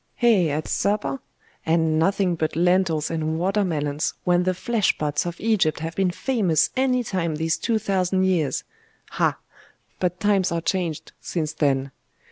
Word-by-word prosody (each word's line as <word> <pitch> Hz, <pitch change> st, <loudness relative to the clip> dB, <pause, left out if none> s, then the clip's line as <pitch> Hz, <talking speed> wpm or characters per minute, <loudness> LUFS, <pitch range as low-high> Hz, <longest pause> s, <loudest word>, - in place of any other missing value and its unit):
'Eh? 205 Hz, -9 st, +4 dB
At 150 Hz, +2 st, -2 dB
supper? 200 Hz, -10 st, 0 dB, 0.4 s
And 160 Hz, -1 st, +2 dB
nothing 190 Hz, +1 st, +2 dB
but 160 Hz, -2 st, -2 dB
lentils 175 Hz, -2 st, +2 dB
and 160 Hz, -1 st, -1 dB
water 195 Hz, +4 st, +1 dB
melons, 150 Hz, -4 st, -1 dB
when 175 Hz, 0 st, +3 dB
the 185 Hz, 0 st, +1 dB
flesh 225 Hz, -1 st, 0 dB
pots 150 Hz, +2 st, -1 dB
of 170 Hz, -, -6 dB
Egypt 205 Hz, -8 st, +1 dB
have 165 Hz, 0 st, -4 dB
been 190 Hz, -1 st, +2 dB
famous 190 Hz, -, +1 dB
any 255 Hz, -1 st, +2 dB
time 180 Hz, -7 st, -2 dB
these 160 Hz, +1 st, 0 dB
two 230 Hz, -2 st, +1 dB
thousand 190 Hz, -3 st, 0 dB
years. 175 Hz, -7 st, +1 dB, 0.5 s
Ah! -, -, +1 dB, 0.6 s
but 180 Hz, -1 st, -1 dB
times 195 Hz, -2 st, +2 dB
are 170 Hz, -, 0 dB
changed 170 Hz, -3 st, -2 dB
since 155 Hz, -3 st, -3 dB
then!.... 135 Hz, -2 st, 0 dB
175 Hz, 155 wpm, -23 LUFS, 155-195 Hz, 0.6 s, Eh